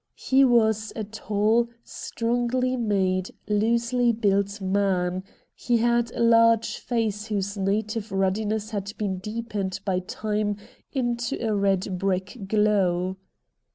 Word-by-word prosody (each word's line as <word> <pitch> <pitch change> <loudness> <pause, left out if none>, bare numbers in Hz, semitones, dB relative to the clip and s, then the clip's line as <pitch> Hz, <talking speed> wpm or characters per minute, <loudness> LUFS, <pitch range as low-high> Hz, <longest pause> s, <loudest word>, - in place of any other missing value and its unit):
He 270 +1 +3
was 220 -4 +3
a 220 - -3
tall, 215 +2 +1
strongly 245 +2 -1
made, 190 -5 0 0.2
loosely 235 +3 +2
built 200 -2 0
man; 190 -2 0 0.3
he 240 -2 0
had 235 0 +2
a - - 0
large 230 -1 +4
face 220 -3 -2
whose 200 -1 -2
native 210 +2 -1
ruddiness 205 +3 0
had 205 -1 -4
been 195 -3 -2
deepened 210 -2 -4
by 190 -2 +1
time 210 +2 -2 0.3
into 240 -2 -1
a 215 - +1
red 195 -2 0
brick 195 +3 -2
glow. 190 -3 +2
210 Hz, 120 wpm, -25 LUFS, 195-230 Hz, 0.3 s, large